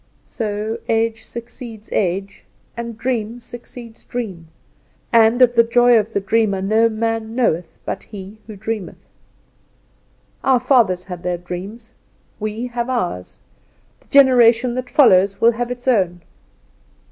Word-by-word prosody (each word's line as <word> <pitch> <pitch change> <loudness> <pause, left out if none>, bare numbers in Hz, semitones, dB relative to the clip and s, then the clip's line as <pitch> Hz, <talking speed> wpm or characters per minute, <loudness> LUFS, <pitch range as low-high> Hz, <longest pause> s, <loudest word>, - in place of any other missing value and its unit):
So 215 0 -4
age 225 0 0
succeeds 235 -2 -9
age, 195 +1 -2 0.3
and 235 -1 -6
dream 235 -1 -2
succeeds 235 -1 -11
dream, 195 -9 -6 0.7
and 230 +2 +5
of 240 -1 +4
the 235 - +6
joy 240 +1 +4
of 215 +1 -3
the - - +1
dreamer 200 0 +1
no 220 +4 +2
man 225 0 -2
knoweth 180 -9 0
but - - -4
he 205 0 -10
who 215 - -8
dreameth. 210 -1 -6 1.4
Our 260 -2 +4
fathers 235 -9 +2
had 180 -2 -7
their 180 0 -2
dream; 180 +5 -7 0.6
we 215 +2 -3
have 240 0 -3
ours; 180 - -3 0.6
the - - -29
generation 250 -3 +5
that 250 0 -4
follows 195 -7 +4
will 230 - +5
have 240 +1 -3
its 245 +1 -7
own. 180 -8 +1
225 Hz, 135 wpm, -19 LUFS, 200-240 Hz, 1.4 s, the